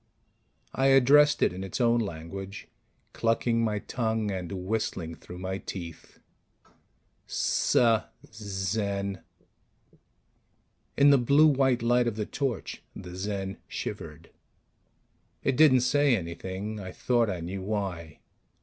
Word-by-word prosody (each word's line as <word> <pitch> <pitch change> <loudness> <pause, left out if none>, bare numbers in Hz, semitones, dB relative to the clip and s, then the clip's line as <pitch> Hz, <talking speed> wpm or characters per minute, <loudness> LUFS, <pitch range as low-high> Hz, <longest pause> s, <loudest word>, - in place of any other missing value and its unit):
I 135 +1 +2
addressed 135 +3 +5
it - - +2
in 95 +1 -6
its 95 - -5
own 120 -1 +3
language, 95 0 -6 0.5
clucking 115 0 +1
my 110 -2 0
tongue 110 -1 -2
and 90 -3 -4
whistling 95 -3 -3
through 90 +2 -11
my 95 +1 -4
teeth: 85 -5 -8 1.1
"Suh, 115 -3 +2 0.3
Zen 100 -1 -3 0.9
" - - -44
In 145 0 +7
the 140 - +6
blue 140 +6 +5
white 135 -5 +3
light 120 +1 +3
of 115 - -1
the 105 -1 -2
torch, 130 -4 -3
the 90 0 -9
Zen 95 0 -4
shivered. 80 +2 -7 1.1
It 135 - +1
didn't 130 -3 +6
say 145 +1 +3
anything. 95 +4 -5
I 95 -2 -7
thought 120 +2 +1
I 90 -3 -3
knew 90 +3 -5
why. 95 -6 -4
105 Hz, 120 wpm, -28 LUFS, 95-120 Hz, 1.1 s, In